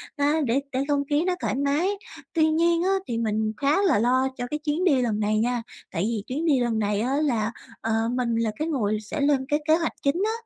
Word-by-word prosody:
à, 295 +2 +2
để 245 +2 +2
để 260 - -1
không 285 -1 +1
khí 295 +2 +2
nó 365 -1 +1
thoải - - -1
mái. 285 +7 +1 0.4
Tuy 315 -2 +3
nhiên 335 +2 +2
á, 375 - +1 0.2
thì 235 - -2
mình 220 -1 0
khá 290 - +2
là 360 - +3
lo 255 +3 +3
cho 245 -1 -3
cái 300 - -2
chuyến 305 +3 -1
đi 285 -8 +4
lần 220 -4 0
này 215 0 +1
nha. 245 +1 0 0.3
Tại 165 - -1
vì 220 -2 -1
chuyến 295 +6 -2
đi 290 -5 +3
lần 235 -2 0
này 205 -1 0
á 255 +4 0
là, 240 -7 +1 0.3
ờ, 225 - -2 0.2
mình 245 -2 0
là 230 -1 0
cái 310 - -1
người 215 -9 0
sẽ 215 +8 -5
lên 280 -2 +2
cái 295 +1 +1
kế 315 - +6
hoạch 335 -1 -1
chính 310 +7 +1
á, 440 - +1
265 Hz, 245 wpm, -25 LUFS, 230-310 Hz, 0.4 s, kế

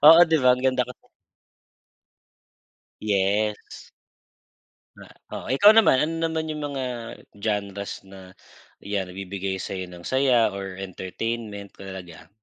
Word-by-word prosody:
Oo, 165 +2 +11
'di 160 0 +3
ba, 125 - +5
ang 125 - -7
ganda 130 -1 +3
kasi. 125 - -7 2.1
Yes. 105 +1 -1 1.1
Na - - -12 0.3
oh, - - -5
ikaw 135 - +6
naman, 220 -12 +6
ano 155 +2 0
naman 160 -1 -2
yung 150 -1 -3
mga 135 -1 -2 0.5
genres 100 -1 -3
na, 95 -1 -12 0.5
'yan, 100 -1 -2
nagbibigay 95 0 -4
sa'yo 95 -1 -4
ng 90 -1 -11
saya 130 -4 +3
or 100 -1 -6
entertainment, 100 +2 -5
tulad 95 -1 -8
niyan? 80 - -14
105 Hz, 125 wpm, -25 LUFS, 95-130 Hz, 2.1 s, Oo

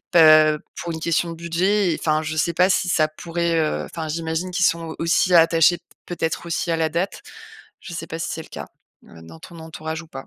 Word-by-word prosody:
heu, 155 -2 +7 0.2
pour 170 - -5
une 160 - -5
question 170 +1 0
de 165 - -6
budget 175 +4 0
et - - -4
enfin, 155 0 +1
je 155 0 -4
sais 165 +2 0
pas 180 +3 +3
si 185 - 0
ça 155 -2 +3
pourrait, 165 +1 -2
heu 155 -1 -1
enfin, 160 -1 -6
j'imagine 160 +3 -3
qu'ils 185 0 +1
sont 165 -1 -1
aussi 170 +2 +2
attachés, 165 +1 +5 0.3
peut-être 170 -1 -3
aussi, 170 0 -2
à 165 - 0
la 160 -1 0
date. 170 +5 -3 0.6
Je 180 - -10
sais 165 - -6
pas 165 - -5
si 165 - -3
c'est 160 - -5
le - - -16
cas, - - -8 0.4
heu, 80 -1 -15
dans 80 0 -13
ton 170 - -13
entourage 160 0 -6
ou - - -15
pas? 135 -3 -9
165 Hz, 230 wpm, -22 LUFS, 155-170 Hz, 0.6 s, heu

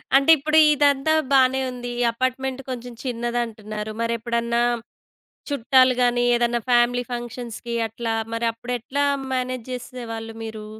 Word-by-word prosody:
అంటే 275 +4 +6
ఇప్పుడు 310 +2 +1 0.2
ఇదంతా 285 +1 +3 0.2
బానే 265 -1 +4
ఉంది. 245 -1 -6
ఈ - - +3
అపార్ట్‌మెంట్ 255 +2 -2
కొంచెం 245 -1 -6
చిన్నదంటున్నారు. 230 -4 -3
మరెప్పుడన్నా 235 0 0 0.9
చుట్టాలు 260 -1 +4
గాని, 245 0 +2
ఏదన్నా 240 0 +1
ఫ్యామిలీ 245 0 +3
ఫంక్షన్స్‌కి 240 -1 -6
అట్లా, 225 +1 -3 0.2
మరి 230 +1 -1
అప్పుడెట్లా 245 +4 -2 0.3
మ్యానేజ్ 255 -2 -2
చేసేవాళ్ళు 230 -2 -6
మీరు? 220 -1 -7
240 Hz, 115 wpm, -23 LUFS, 230-255 Hz, 0.9 s, అంటే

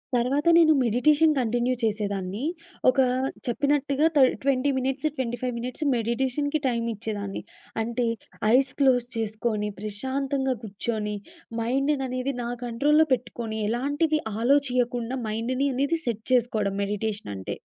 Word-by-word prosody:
తర్వాత 265 +6 +1
నేను 320 -2 +6
meditation 295 +7 +4
continue 245 +1 +1
చేసేదాన్ని. 205 -1 -2 0.5
ఒక 255 - 0 0.5
చెప్పినట్టుగా 285 +3 +1
త - - +5 0.2
20 275 0 +2
మినిట్స్, 265 +3 0
25 245 0 -2
మినిట్స్ 250 +6 -4
మెడిటేషన్‌కి 260 +6 0
టైం 235 -2 0
ఇచ్చేదాన్ని. 205 -2 -4 0.4
అంటే 235 +1 -1 0.5
ఐస్ 270 +1 +3
క్లోజ్ 255 -3 +4
చేసుకొని 215 -1 -1
ప్రశాంతంగా 265 +5 -2
కూర్చొని, 210 0 -3 0.5
మైండ్‌‌ననేది 265 +1 0
నా 235 - -3 0.2
కంట్రోల్‌లో 295 +7 +3
పెట్టుకొని, 230 -3 -3
ఎలాంటిది 290 +6 +1 0.2
ఆలోచియ్యకుండా 250 -2 +1
మైండ్‌ని 250 +5 -1
అనేది 280 +5 +1
సెట్ 225 -3 -3
చేసుకోవడం 220 -5 +1
మెడిటేషన్ 205 - -3
అంటే. 95 - -5
245 Hz, 110 wpm, -26 LUFS, 225-275 Hz, 0.5 s, నేను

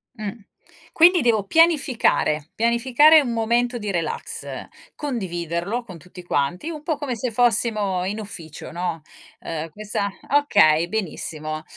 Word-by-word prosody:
Mh. 215 -4 -4 0.6
Quindi 345 0 +6
devo 225 -4 +2
pianificare. 255 - +2
Pianificare 255 +7 +5
un 245 -4 -3
momento 235 +2 0
di 210 -3 -4
relax, 165 -4 -3 0.5
condividerlo 190 - -3
con 185 -7 -11
tutti 180 +2 -13
quanti, 175 - -1
un 305 -2 -7
po' 310 -2 -1
come 275 -4 -3
se 235 +1 -3
fossimo 215 -5 +2
in 210 +3 -3
ufficio, 170 -7 -9
no? 170 -1 -3 0.4
Ehm, 160 0 -5
questa 205 +1 -3 0.2
okay, 200 - +4
benissimo. 155 -6 -4
215 Hz, 125 wpm, -22 LUFS, 175-245 Hz, 0.6 s, Quindi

